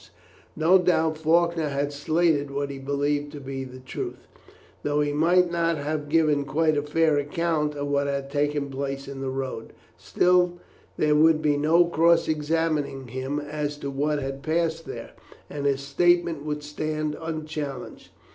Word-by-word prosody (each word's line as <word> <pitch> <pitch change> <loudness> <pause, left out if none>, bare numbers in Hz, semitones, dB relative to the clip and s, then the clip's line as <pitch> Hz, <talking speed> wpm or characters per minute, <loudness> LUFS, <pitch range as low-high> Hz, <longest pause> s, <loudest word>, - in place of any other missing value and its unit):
No 170 +4 +5
doubt 160 -3 +2
Faulkner 165 0 +2
had 140 +1 -2
stated 155 0 +1
what 140 0 -3
he 135 - -7
believed 145 +1 -1
to 145 - -7
be 135 -1 -5
the 130 -1 -10
truth, 130 - -6 0.5
though 145 0 0
he 145 0 +1
might 175 +4 +3
not 170 -1 +1
have 150 0 -3
given 150 -2 +3
quite 155 +2 +1
a 145 - +1
fair 150 0 +2
account 150 0 -1
of 145 0 -3
what 140 0 0
had 140 -1 -3
taken 145 -1 0
place 135 0 -4
in 135 -1 -7
the 135 - -2
road; 130 -4 -5 0.2
still, 180 -1 +2 0.4
there 150 -1 +3
would 155 +1 +5
be 150 -2 +2
no 160 +4 +4
cross 170 0 +3
examining 150 -4 -1
him 130 +4 -3
as 145 0 -4
to 140 -1 -5
what 145 +2 0
had 135 0 -5
passed 165 +1 -1
there, - - -7 0.4
and 145 -1 -2
his 140 -1 +1
statement 170 +2 +2
would 150 -1 -3
stand 155 0 -3
unchallenged. 155 -4 -5
150 Hz, 165 wpm, -25 LUFS, 140-160 Hz, 0.5 s, No